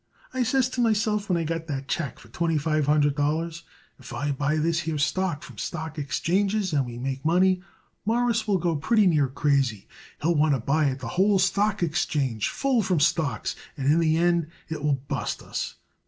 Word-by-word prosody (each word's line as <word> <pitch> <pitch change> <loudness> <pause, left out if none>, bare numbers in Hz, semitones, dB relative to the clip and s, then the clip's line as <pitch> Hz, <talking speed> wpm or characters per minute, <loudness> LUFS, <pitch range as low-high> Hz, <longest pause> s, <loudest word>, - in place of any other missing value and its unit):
I 260 - -1
says 255 +1 +2
to 255 -1 -2
myself 215 -2 +1
when 180 - +2
I 165 - 0
got 165 0 -3
that 135 -3 -4
check 140 -2 -2
for 115 - -16
twenty 165 +5 0
five 155 0 0
hundred 145 -1 +3
dollars: 160 +3 -1 0.4
If - - -10
I 145 0 -1
buy 145 +2 0
this 160 +1 +1
here 160 -2 -2
stock 160 +1 0
from - - -11
stock 160 -2 -4
exchanges 190 +6 0
and 140 -4 +1
we 120 -1 -7
make 135 +2 -4
money 180 +3 +3 0.4
Mawruss 230 0 +1
will 200 -2 +3
go 170 -2 0
pretty 205 +8 +3
near 155 -6 +3
crazy. 135 -5 0 0.3
He'll 170 +3 +2
want 150 -2 +3
to - - -2
buy 145 +6 +1
it 135 -1 -1
the 120 - -5
whole 195 - +3
stock 200 +1 +1
exchange 145 -8 0
full 270 -4 +1
from 185 -5 +1
stocks, 145 -6 +1 0.2
and 140 +1 +2
in 165 - +3
the 160 -1 +3
end 170 -1 +2 0.2
it 155 -2 -4
will 140 -3 0
bust - - -3
us. - - -4
160 Hz, 200 wpm, -26 LUFS, 145-185 Hz, 0.4 s, hundred